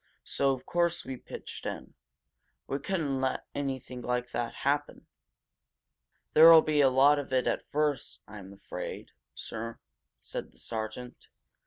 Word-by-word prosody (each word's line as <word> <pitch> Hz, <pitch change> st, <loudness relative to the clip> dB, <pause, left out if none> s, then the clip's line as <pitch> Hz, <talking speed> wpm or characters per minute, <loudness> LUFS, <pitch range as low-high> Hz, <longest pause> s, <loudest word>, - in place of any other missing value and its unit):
"So 140 Hz, -, 0 dB
of 130 Hz, -2 st, -4 dB
course 170 Hz, -1 st, 0 dB
we 130 Hz, -, -4 dB
pitched -, -, -9 dB
in. -, -, -6 dB, 0.7 s
We 140 Hz, -, -3 dB
couldn't 145 Hz, -6 st, -1 dB
let 130 Hz, -, -1 dB
anything 130 Hz, -3 st, -4 dB
like 125 Hz, 0 st, -2 dB
that 120 Hz, 0 st, -2 dB
happen." 145 Hz, +1 st, 0 dB, 1.3 s
"There'll 160 Hz, +1 st, +9 dB
be 150 Hz, -1 st, +2 dB
a 135 Hz, -, +6 dB
lot 140 Hz, +3 st, +5 dB
of 140 Hz, -, -6 dB
it 130 Hz, -1 st, +2 dB
at -, -, -1 dB
first, 150 Hz, -2 st, -1 dB
I'm 100 Hz, -2 st, -10 dB
afraid, 100 Hz, -, -7 dB, 0.2 s
sir," 115 Hz, +1 st, -6 dB, 0.4 s
said -, -, -6 dB
the -, -, -25 dB
sergeant. 115 Hz, +2 st, -6 dB
135 Hz, 140 wpm, -30 LUFS, 125-145 Hz, 1.3 s, There'll